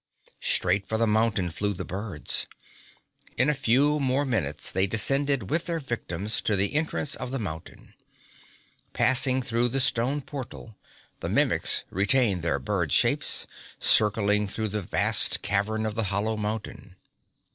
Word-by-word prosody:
Straight 95 +2 +1
for 110 - -1
the 115 - +2
mountain 105 -5 +1
flew 100 +4 -2
the 90 0 -6
birds. 95 -3 -3 0.9
In 125 +5 +3
a - - +4
few 145 +2 +2
more 135 +1 0
minutes 75 - -2
they 95 +1 +1
descended 135 +1 +1
with 165 +2 +1
their 170 -1 -1
victims 110 - -2
to 105 - 0
the 100 +5 0
entrance 155 -1 0
of 125 -3 -4
the 135 - -3
mountain. 80 -9 -8 1.0
Passing 130 0 +3
through 120 0 0
the 135 +3 -1
stone 130 +3 +2
portal, 130 -5 -9 0.4
the - - -4
Mimics - - +2
retained 100 0 +2
their 80 -4 0
bird 65 - -2
shapes, - - +2 0.3
circling 105 -1 +2
through 110 +2 -3
the 105 +1 -3
vast 90 - +2
cavern 110 +2 -1
of 110 - -2
the 110 0 -1
hollow 100 +3 -1
mountain. 105 -2 -5
110 Hz, 145 wpm, -26 LUFS, 100-130 Hz, 1.0 s, a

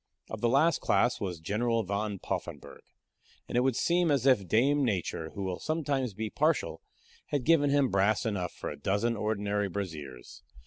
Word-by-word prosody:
Of - - -5
the 120 - +2
last 155 +7 +3
class 120 +5 +2
was 90 -5 -3
General 115 +7 0
Van 100 +1 -2
Poffenburgh; - - -6 0.7
and - - -6
it 120 - +4
would 130 -1 +1
seem 175 +3 +2
as 140 -3 +1
if 125 -9 +4
dame 140 - +3
Nature, 90 -8 -2
who 100 - -4
will 95 -2 -3
sometimes 140 -8 -1
be 110 0 -4
partial, 155 +3 0 0.5
had 145 -3 -1
given 145 -1 +4
him 140 -2 +3
brass 100 +3 +2
enough 95 -6 -2
for - - -6
a - - -8
dozen 100 +8 0
ordinary 105 -1 -1
braziers. 75 -10 -7
110 Hz, 175 wpm, -29 LUFS, 100-135 Hz, 0.7 s, it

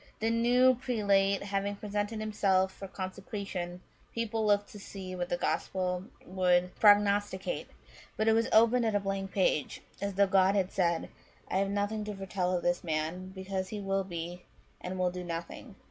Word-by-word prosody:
" - - -35
The 225 +1 +1
new 245 +3 +5
prelate 200 -6 +1
having 200 0 -2
presented 205 +1 -3
himself 195 -3 +1
for 195 - -8
consecration, 185 -1 -5 0.3
people 225 -1 -1
looked 205 -1 +2
to 205 - -10
see 190 -2 -7
what 175 -1 -3
the 175 - 0
Gospel 180 0 -1 0.2
would 180 -1 +2
prognosticate; 205 -2 +3 0.5
but 215 - +1
it 220 - +6
was 230 +1 +2
opened 230 +2 +5
at 215 - 0
a - - +4
blank 195 -1 -3
page, 180 -7 0 0.2
as 200 -1 -2
though 200 +1 +5
God 190 0 +4
had 190 -2 +1
said, 170 -3 0 0.2
* - - -31
I - - +1
have 195 0 +1
nothing 205 +2 -1
to 210 -1 -5
foretell 185 -2 -1
of 175 - -5
this 175 0 +1
man, 160 +3 -2
because 190 0 -4
he 210 - -5
will 195 -1 0
be, 175 -1 -6 0.4
and 185 +1 -4
will 180 -1 +1
do, 180 0 -6
nothing.' 170 -1 -6
195 Hz, 180 wpm, -30 LUFS, 185-205 Hz, 0.5 s, it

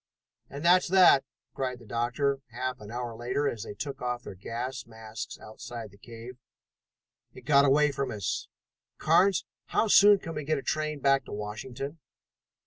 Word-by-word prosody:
"And 140 +4 -7
that's 180 +1 +5
that!" 180 -7 +6 0.3
cried 130 -2 -3
the 120 - -16
doctor 125 +5 -1
half 125 +1 -4
an 105 - -10
hour 120 0 -5
later 125 +5 -1
as 115 -5 -3
they 105 - -7
took 140 +5 -6
off 125 -1 -2
their - - -8
gas 120 +6 -5
masks 110 0 -8
outside 110 0 -9
the 100 - -19
cave. 120 +2 -10 1.0
"It - - -10
got 140 -1 +5
away 145 +2 +4
from 140 -1 -2
us. 105 -5 -3 0.5
Carnes, 180 +4 +3 0.2
how 220 - +1
soon 205 0 +8
can 165 -3 -7
we 150 - -4
get 155 +2 0
a 135 - -5
train 155 -1 -2
back 135 -1 +3
to - - -11
Washington?" 125 +8 -6
130 Hz, 170 wpm, -28 LUFS, 115-145 Hz, 1.0 s, soon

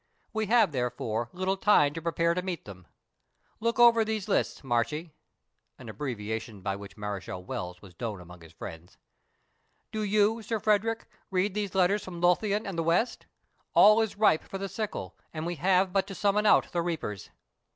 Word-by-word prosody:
We 220 -1 -1
have, 225 -5 +4
therefore, 120 -3 -2
little 185 +2 -1
time 150 -8 +4
to 165 - -5
prepare 170 +1 +1
to 180 - -1
meet 180 -3 -5
them. 90 -4 -11 0.7
Look 230 +1 0
over 235 -2 +7
these 215 -2 -3
lists, 205 - 0
Marchie 140 +6 -1 0.7
(an - - -10
abbreviation 110 -5 -5
by 95 +1 -2
which 100 +1 -10
Mareschal 100 -3 -5
Wells 90 0 -5
was 95 -3 -13
known 110 -5 -3
among 90 0 -13
his 80 -1 -14
friends). 80 +1 -10 0.9
Do 215 - -3
you, 210 +2 +2
Sir 225 +1 -2
Frederick, 220 +2 +1 0.2
read 190 +1 +1
these 205 -2 -3
letters 190 +2 +3
from 175 -2 -7
Lothian 200 +4 +2
and 190 -5 -4
the - - +1
west 175 +9 0 0.5
all 215 +2 +7
is 220 -2 -2
ripe 210 -7 +4
for 195 - -6
the 195 +1 -4
sickle, 195 - -4 0.2
and 155 +1 -3
we 175 0 -3
have 185 +3 +2
but 195 -1 +1
to 195 - -7
summon 210 +2 +2
out - - +4
the 175 - 0
reapers." 160 - -4
175 Hz, 180 wpm, -28 LUFS, -, 0.9 s, over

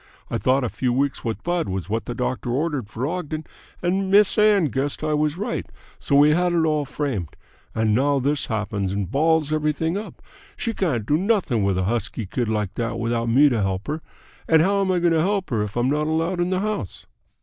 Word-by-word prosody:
I - - -1
thought 130 +1 +2
a 120 - -1
few 125 +2 -1
weeks 135 +2 0
with 110 -3 -3
Bud 175 - -1
was 95 -1 -3
what 110 0 -2
the 120 - -5
doctor 125 0 -2
ordered 140 -2 -1
for 120 +3 -3
Ogden, 155 -1 -3 0.4
and 190 +2 0
Miss 200 +1 +5
Ann 210 -4 +4
guessed 140 +3 -2
I 155 0 0
was 150 +1 0
right, 215 +5 -3 0.3
so 140 - 0
we 145 +2 +6
had 175 +2 +2
it 165 -2 +2
all 155 -2 +1
framed. 130 - -3 0.4
And 110 -1 +2
now 140 +5 +2
this 140 +1 0
happens 105 -3 -2
and 100 -2 -3
balls 155 +1 +2
everything 155 +3 0
up! 215 - -9 0.4
She 230 - -2
can't 140 - -1
do 145 +6 +2
nothing 185 - +1
with 100 -1 +1
a 95 - +1
husky 110 +1 -2
kid 115 +4 -2
like 105 -4 -1
that 115 +1 -3
without 115 0 -1
me 135 +6 +6
to 120 -5 0
help 95 0 -1
her. 155 +2 -3 0.5
And 160 -1 +5
how 200 +2 +2
am 190 -1 +1
I 185 - +2
going 170 -1 +2
to 160 - +3
help 195 0 0
her 110 -3 +1
if 105 +2 -4
I'm 125 +3 +2
not 150 +1 0
allowed 165 +3 0
in 175 0 +1
the 185 0 0
house?" 210 - -4
145 Hz, 225 wpm, -23 LUFS, 115-170 Hz, 0.5 s, we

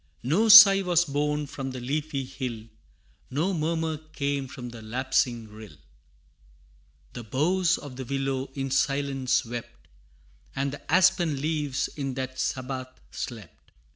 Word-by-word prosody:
No 180 - +2
sigh 205 -3 +10
was 175 -2 +2
borne 150 0 -1
from 135 -1 -6
the 130 -1 -6
leafy 140 +2 -3
hill, 125 -4 -6 0.7
No 165 +9 -1
murmur 160 -1 -1 0.2
came 140 -2 -2
from 125 -2 -8
the 115 -1 -10
lapsing 120 0 -1
rill; 105 -5 -12 1.4
The 120 - -7
boughs 170 - +1
of 140 -4 -10
the 130 - -5
willow 135 0 -2
in 135 -1 -3
silence 135 -2 0
wept, 120 0 -8 0.7
And 140 0 -2
the 145 - -9
aspen 180 -4 +3
leaves 150 -2 -1
in 135 -3 -5
that 130 0 -5
sabbath 130 0 -4
slept. 110 -10 -9
135 Hz, 135 wpm, -26 LUFS, 130-155 Hz, 1.4 s, sigh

